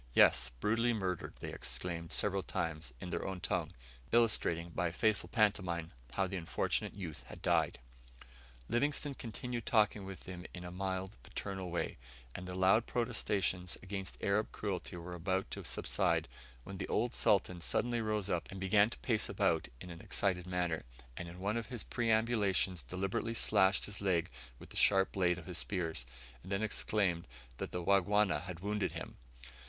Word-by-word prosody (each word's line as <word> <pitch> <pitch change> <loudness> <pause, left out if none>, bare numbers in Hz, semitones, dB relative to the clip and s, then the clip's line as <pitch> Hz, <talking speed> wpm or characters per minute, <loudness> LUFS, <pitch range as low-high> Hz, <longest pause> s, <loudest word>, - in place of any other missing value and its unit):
"Yes, 60 - +6
brutally 115 - +2
murdered!" 95 -5 -2
they - - -4
exclaimed 85 +7 -3
several 100 -1 +1
times, 80 -6 -2
in 90 - -6
their - - -1
own 95 -1 -3
tongue; 85 - -1 0.4
illustrating, 85 -8 +3
by 85 +1 0
a - - -2
faithful 105 +4 +1
pantomime, 90 -7 +1 0.2
how 95 - +2
the 95 +1 -3
unfortunate 85 -2 -1
youth 85 -7 -6
had - - -9
died. - - +3 0.9
Livingstone 145 +3 +1
continued 120 -1 -5
talking 105 -2 +3
with 95 -1 -7
them 90 -1 -7
in 90 - -7
a 90 - -6
mild, 95 +1 -3
paternal 95 +6 -4
way, 85 -7 -2 0.3
and 90 - -6
their 90 - -5
loud 95 +5 +4
protestations 100 -6 0
against 95 0 -5
Arab 100 +2 +1
cruelty 95 -5 -3
were 85 +1 -6
about 95 +2 -1
to - - -5
subside, - - +1 0.4
when 95 0 -7
the - - -2
old 120 +3 +1
Sultan 90 -3 +3
suddenly 120 +7 +1
rose 105 -3 0
up 90 -4 -1
and 95 - -7
began 100 +3 +5
to - - -8
pace 115 -4 +1
about - - +2
in 90 - -8
an 85 -1 -9
excited 90 -3 +1
manner, 90 -3 0 0.3
and 85 - -5
in 85 - -10
one 100 +4 0
of 115 -2 -3
his 120 -2 -5
perambulations 110 -6 +2
deliberately 95 - -2
slashed 100 -3 +4
his 105 -1 -5
leg 90 -7 +1 0.3
with - - -13
the - - -5
sharp 95 -1 +5
blade 90 -2 +2
of 85 - -9
his 90 -1 -2
spear, 90 -5 -1 0.5
and 95 - -10
then 100 +2 +1
exclaimed 100 - 0 0.3
that - - -3
the 90 - -3
Wangwana 100 -3 +4
had 90 -1 -7
wounded 105 0 0
him! - - -6
95 Hz, 170 wpm, -35 LUFS, 90-105 Hz, 0.9 s, Yes